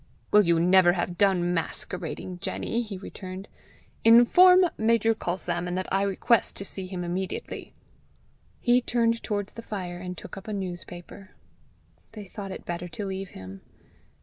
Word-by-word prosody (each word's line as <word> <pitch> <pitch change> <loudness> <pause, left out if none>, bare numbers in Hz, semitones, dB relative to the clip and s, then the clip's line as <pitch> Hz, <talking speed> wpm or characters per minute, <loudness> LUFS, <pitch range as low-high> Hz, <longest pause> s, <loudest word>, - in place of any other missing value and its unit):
"Will 210 - +7
you 170 -2 +3
never 180 0 +5
have 175 0 -2
done 180 -3 +3
masquerading, 180 +1 -4
Jenny?" 230 +6 -2
he 210 -4 -6
returned. 185 +1 -8 0.6
"Inform 360 +12 +7
Major 225 0 +3
Culsalmon 175 -3 -3
that 185 0 -2
I 195 - +3
request 200 +4 +1
to 200 - -4
see 190 -1 -3
him 180 -1 -5
immediately." 180 +2 -5 0.8
He 245 0 +3
turned 230 -1 +1
towards 205 -2 -3
the 230 - -8
fire, 180 -5 -5
and 180 0 -6
took - - -9
up 195 - -10
a 215 - -3
newspaper. 180 0 -7 0.8
They 215 -2 -8
thought 195 0 -7
it - - -8
better 175 0 -4
to 205 +4 -5
leave 190 0 -4
him. 95 +1 -10
190 Hz, 150 wpm, -26 LUFS, 175-215 Hz, 0.8 s, Will